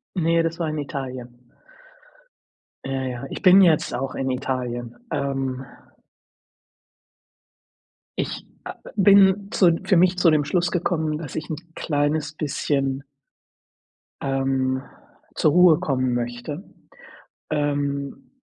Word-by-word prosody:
Ne, 165 -1 +2
das 165 0 -2
war 165 - -1
in 155 - -3
Italien. 125 -4 -7 1.4
Ja, 135 0 -2
ja, 125 0 -4
ich - - -6
bin 190 +1 +7
jetzt 165 -4 +3
auch 135 +1 -3
in 135 - -2
Italien, 125 -2 -3 0.2
ähm. 135 -2 -2 2.5
Ich, - - -3 0.2
ah - - -6
ah, - - -11
bin 200 0 +5
zu 170 -6 +4
für 190 -1 +2
mich 180 +1 +4
zu 175 -2 +5
dem 150 -1 +3
Schluss 175 +5 0
gekommen, 160 -3 -1
dass 155 -5 -7
ich 160 +1 -4
'n - - -1 0.2
kleines 150 0 -1
bisschen 140 -2 -1 1.2
ähm, 135 -1 0 0.5
zur 155 - +3
Ruhe 175 -1 +6
kommen 130 -3 0
möchte. 120 +7 -4 0.9
Ähm, 140 -1 -2
145 Hz, 115 wpm, -23 LUFS, 130-165 Hz, 2.5 s, bin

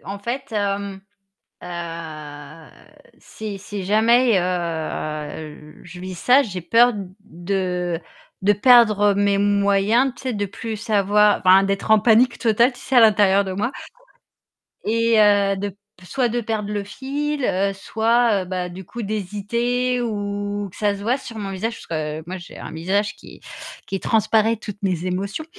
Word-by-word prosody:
en 200 +1 -6
fait, 260 +6 -5
hem, 200 -1 -2 0.6
heu, 160 -3 -8 0.5
si 210 -2 -8
si 200 0 -6
jamais, 225 +2 +4
heu, 155 -3 -4
je 175 +1 -11
vis 185 0 -6
ça, 250 +10 +4
j'ai 185 -7 -6
peur 235 +7 +4 0.3
de 180 -2 -3 0.4
de 205 +2 +4
perdre 215 -3 +5
mes 200 0 +2
moyens, 205 +5 +2
tu - - -13
sais, 255 -2 -2
de 205 -1 -2
plus 220 +3 -6
savoi 210 -1 +3
enfin 185 +1 +7
d'être 195 +2 -2
en 220 - +7
panique 235 +3 +4
totale, 235 +2 +3
tu 245 - -15
sais, 265 - -1
à - - +9
l'intérieur 205 -3 +5
de 190 - -4
moi 210 +7 -1 1.2
et 230 0 +2
heu, 205 -2 +4
de 200 +1 -3
p 195 - -15 0.3
soit 250 +3 0
de 240 +1 -1
perdre 215 -2 -3
le 205 -1 -2
fil, 280 +6 -4
heu, 195 0 +1
soit, 225 0 +1
heu, - - -10
bah, 180 -1 -3
du 180 +1 -10
coup 235 +4 -7
d'hésiter 235 +5 -1
ou 205 -2 -3
que 185 - -16
ça 205 -1 +1
se 200 - -9
voie 240 +5 +1
sur 230 -5 -10
mon 200 -2 -4
visage 225 +5 -3
parce - - -12
que 155 -1 -4
moi 185 +1 -5
j'ai 175 - -12
un - - -8
visage 195 +6 -1
qui - - -15 0.5
qui 195 - -3
transparaît 225 0 +2
toutes 205 -2 -8
mes 180 -2 -1
émotions. 195 +11 -3
205 Hz, 165 wpm, -21 LUFS, 185-225 Hz, 1.2 s, à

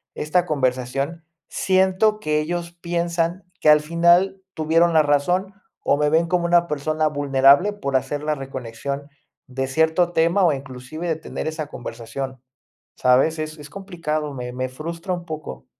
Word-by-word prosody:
esta 175 +4 +1
conversación, 135 +2 -1 0.3
siento 190 +3 +2
que 150 -3 0
ellos 170 +2 -3
piensan 170 +1 -2
que 155 - +3
al 150 0 +8
final 175 +4 +3
tuvieron 165 +2 +2
la 155 - +6
razón 175 +7 +1 0.3
o - - +2
me 150 0 +2
ven 165 +1 +3
como 175 -1 +1
una 175 0 +4
persona 155 +1 0
vulnerable, 145 +6 +4
por 140 -9 -3
hacer 145 +3 0
la 150 0 0
reconexión 135 +1 -6 0.4
de 135 +1 -3
cierto 160 +4 +2
tema 170 +4 +3
o 160 - +4
inclusive 135 +5 -7
de 160 - +1
tener 160 - -6
esa 155 -2 -4
conversación, 125 +2 -7 0.6
¿sabes? 135 +6 +3
Es 155 0 -5
es 145 0 -10
complicado, 165 -6 -4
me 125 -1 -5
me 130 0 -2
frustra 165 +6 -5
un 175 -1 -4
poco. 155 -2 -7
155 Hz, 155 wpm, -22 LUFS, 140-170 Hz, 0.6 s, al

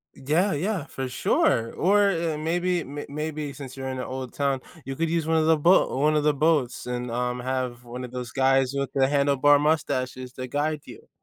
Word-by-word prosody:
Yeah, 160 +9 +1
yeah, 180 +1 -1
for 135 -4 -5
sure. 115 -2 +1
Or, 200 +2 +3
eh, 165 -3 -1
maybe 175 +2 0
may 145 +2 -7
maybe 150 0 -4
since 135 -2 -9
you're 135 -1 -5
in 130 - -4
an 125 - -3
old 130 -1 -5
town, 140 -2 -1 0.2
you 135 0 -4
could 165 +1 -1
use 165 -1 0
one 160 0 +2
of 160 0 +2
the 160 -1 +5
bo 170 -1 +4
one 155 +1 +3
of 150 - +2
the 150 -1 +3
boats 150 -6 +1
and, 125 0 -3
um, 125 +1 -2
have 125 -1 -3
one 125 +1 -7
of 125 - -7
those 125 -2 -6
guys 135 0 +2
with 140 -1 -2
the 135 -1 +3
handlebar 145 0 +4
mustaches 130 -4 -1
to 130 0 -6
guide 150 +3 -1
you. - - -13
140 Hz, 215 wpm, -25 LUFS, 130-155 Hz, 0.2 s, the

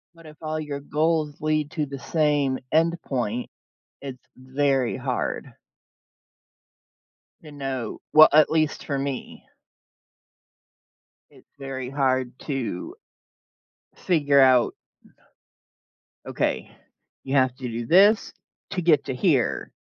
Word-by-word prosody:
But 165 -1 -17
if 150 -1 -13
all 155 0 -3
your 145 -2 -4
goals 155 +1 -1
lead 155 -1 0
to 150 -3 -2
the 140 -1 -8
same 145 -4 +1
endpoint, 135 -8 0 0.5
it's 130 -2 -9
very 130 -1 0
hard - - -3 1.9
to 150 - -11
know 135 -4 -5
well, 155 0 +9
at 155 0 +6
least 155 -1 0
for 140 -2 -2
me. 135 -1 -5 1.8
It's - - -21
very 130 -2 -5
hard 130 -2 0
to 150 - -4 1.0
figure 145 -6 +2
out 130 -2 +4 1.5
"Okay, - - -2 0.5
you 135 +1 -2
have 130 -2 +3
to 130 - -5
do 115 0 -4
this 200 - +4 0.4
to 185 -3 -2
get 160 -4 +3
to 130 - -3
here." 140 -5 +1
140 Hz, 110 wpm, -24 LUFS, 130-155 Hz, 1.9 s, well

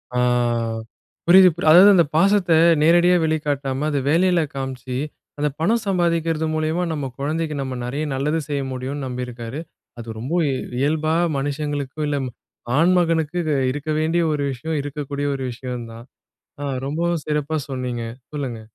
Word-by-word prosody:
ஆ. - - +2 1.1
புரியுது 185 +1 +8
புரி 175 - -4
அதாவது 185 +5 +9
அந்த 175 -3 +6
பாசத்த 195 0 +3 0.3
நேரடியா 175 +3 +5
வெளிக்காட்டாம 145 -3 -1
அத 145 - 0
வேலையில 175 +1 +3
காமிச்சு, 130 -1 -5 0.4
அந்த 150 0 0
பணம் 225 +7 +2
சம்பாதிக்கிறது 165 -3 +1
மூலியமா, 155 +3 0
நம்ம 145 -4 -3
குழந்தைக்கு 155 +2 -2
நம்ம 130 -2 -4
நெறைய 140 +5 -3
நல்லது 150 +4 0
செய்ய 145 -2 -1
முடியும்னு 135 +2 -4
நம்பியிருக்காரு. 125 +1 -5 0.4
அது 115 -1 -7
ரொம்ப 130 +7 -5 0.2
இ - - 0 0.3
இயல்பா, 155 +2 +1 0.2
மனுஷங்களுக்கு, 145 0 -3
இல்ல 145 -1 0 0.6
ஆண்மகனுக்கு 170 -1 +2 0.3
இருக்க 145 +2 -5
வேண்டிய 165 +2 +1
ஒரு 145 -1 -1
விஷயம். 155 +5 -3
இருக்கக்கூடிய 145 0 -4
ஒரு 135 - -5
விஷயம் 125 -1 -6
தான். 115 +1 -11 0.6
அ - - -3 0.2
ரொம்பவும் 165 +2 -1
சிறப்பா 150 +1 -1
சொன்னீங்க 125 -3 -3 0.3
சொல்லுங்க. 125 -6 -4
150 Hz, 140 wpm, -22 LUFS, 135-165 Hz, 1.1 s, அதாவது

